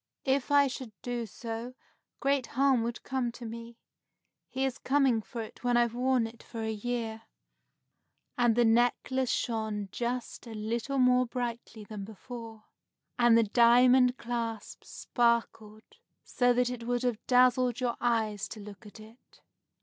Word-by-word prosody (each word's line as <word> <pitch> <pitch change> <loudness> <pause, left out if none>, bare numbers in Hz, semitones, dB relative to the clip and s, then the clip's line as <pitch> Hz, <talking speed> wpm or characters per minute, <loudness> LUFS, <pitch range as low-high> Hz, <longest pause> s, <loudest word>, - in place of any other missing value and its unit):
"If 270 -1 +1
I 285 0 +5
should 255 -5 -6
do 240 -2 -3
so, 230 +3 -6 0.4
great 275 -2 +1
harm 270 -3 +4
would 235 +1 -4
come 255 -2 -2
to 240 - -9
me. 230 +1 -8 0.7
He 265 +1 -1
is 265 -2 -3
coming 265 -4 +2
for 230 +2 -7
it 220 - -13
when 245 -1 +2
I've 235 -1 +2
worn 250 -1 +1
it 225 +1 -10
for 225 -2 -7
a 220 - -1
year." 225 0 -3 1.1
And 240 -2 +3
the 240 0 +4
necklace 245 +2 +2
shone 220 -5 -2
just 245 +1 -4
a 225 - -8
little 230 +6 -2
more 250 -1 +4
brightly 235 -2 -5
than 205 -1 -7
before, 225 +1 -9 0.6
and 240 -1 +6
the 230 - +5
diamond 245 +3 +5
clasp 230 -2 -5
sparkled 225 -3 -1 0.4
so 245 -1 +2
that 245 0 +1
it 235 -2 -7
would 245 0 0
have 240 -3 -1
dazzled 250 -1 +4
your 245 -2 -1
eyes 220 -4 0
to 220 - -9
look 210 +1 -11
at 210 - -13
it. 220 +3 -17
240 Hz, 155 wpm, -29 LUFS, 225-250 Hz, 1.1 s, and